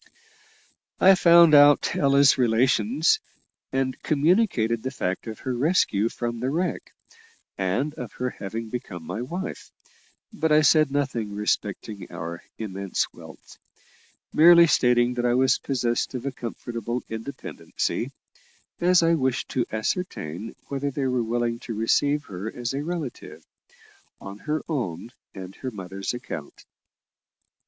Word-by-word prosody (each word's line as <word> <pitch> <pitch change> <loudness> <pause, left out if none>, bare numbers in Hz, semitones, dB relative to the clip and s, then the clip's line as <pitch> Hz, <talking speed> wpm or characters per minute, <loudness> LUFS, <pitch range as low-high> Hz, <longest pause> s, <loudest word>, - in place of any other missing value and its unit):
I 195 - +7
found 170 -3 +6
out 145 0 +6
Ella's 140 0 +5
relations, 130 - +2 0.5
and 130 -1 -1
communicated 150 - +2
the 130 - -3
fact 95 -6 -3
of 110 - -7
her 130 - -2
rescue 120 - +2
from 120 -1 -4
the 125 +2 -1
wreck, 170 +4 -2 0.6
and 100 +11 -1
of 125 -7 -8
her 125 0 -3
having 110 +3 -6
become 110 -8 -6
my 110 - -4
wife; 175 +10 -6 0.6
but 160 -7 -1
I 155 0 +5
said 155 0 +5
nothing 130 -7 -2
respecting 105 -1 -3
our 85 +1 -6 0.2
immense 100 -3 -3
wealth, - - -14 0.7
merely 170 +2 +8
stating 125 -5 +3
that 120 0 -2
I 120 - +2
was 130 0 +3
possessed 125 -1 -1
of 125 +1 -5
a 140 - -1
comfortable 120 -1 -5
independency, 115 +5 -4 0.7
as 175 0 +4
I 165 0 +4
wished 130 -5 0
to 125 -2 -1
ascertain 110 - -3
whether 140 0 -2
they 140 0 -3
were 125 -1 +1
willing 115 0 -1
to 115 - -2
receive 145 +7 +1
her 100 +4 -6
as 120 0 -4
a 140 +2 -2
relative, 160 -6 -6 0.7
on 100 +1 -9
her 155 +1 0
own 115 - -3 0.2
and 95 -1 -8
her 130 - -4
mother's 95 -3 -5
account. 120 - -8
125 Hz, 135 wpm, -25 LUFS, 110-145 Hz, 0.7 s, merely